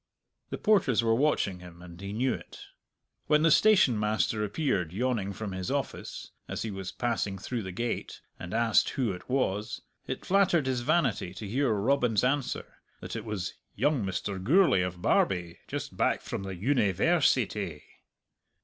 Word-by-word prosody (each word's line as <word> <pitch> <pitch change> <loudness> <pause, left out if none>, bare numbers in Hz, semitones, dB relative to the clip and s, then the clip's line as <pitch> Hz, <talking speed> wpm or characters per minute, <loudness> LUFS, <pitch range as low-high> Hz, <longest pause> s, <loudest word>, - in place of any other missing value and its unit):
The - - -4
porters 165 - +3
were 115 0 +3
watching 115 -8 +1
him, 90 -1 -12
and 85 0 -11
he 100 0 -5
knew 125 +5 +1
it. - - -9 0.7
When 150 0 +4
the 165 - +5
stationmaster 110 - +3
appeared 105 - -1
yawning 110 -3 -1
from 100 +1 -5
his 95 -1 -4
office, - - -4 0.2
as - - -4
he 110 - -3
was 95 -2 -5
passing 115 -5 -2
through 115 +5 -4
the 95 -2 -6
gate, 115 +6 -3 0.2
and 90 - -7
asked 115 -1 +3
who 125 -6 -1
it 90 +5 -9
was, 110 -6 -1 0.2
it - - -5
flattered 180 -6 +3
his 130 -2 0
vanity 125 - +1
to 100 +3 -6
hear 130 +4 +1
Robin's 115 +1 +2
answer, 135 +1 -1 0.2
that - - -7
it 115 -1 -5
was 105 -5 -3 0.2
"young 145 -7 +1
Mr. 95 0 -3
Gourlay 160 - +4
of 90 -1 -4
Barbie, 90 -3 +1
just - - -5
back - - +1
from - - -5
the 95 -1 -5
Univ 100 -2 +1
ai 170 +6 +4
rsity!" 100 - +1
110 Hz, 165 wpm, -29 LUFS, 95-130 Hz, 0.7 s, the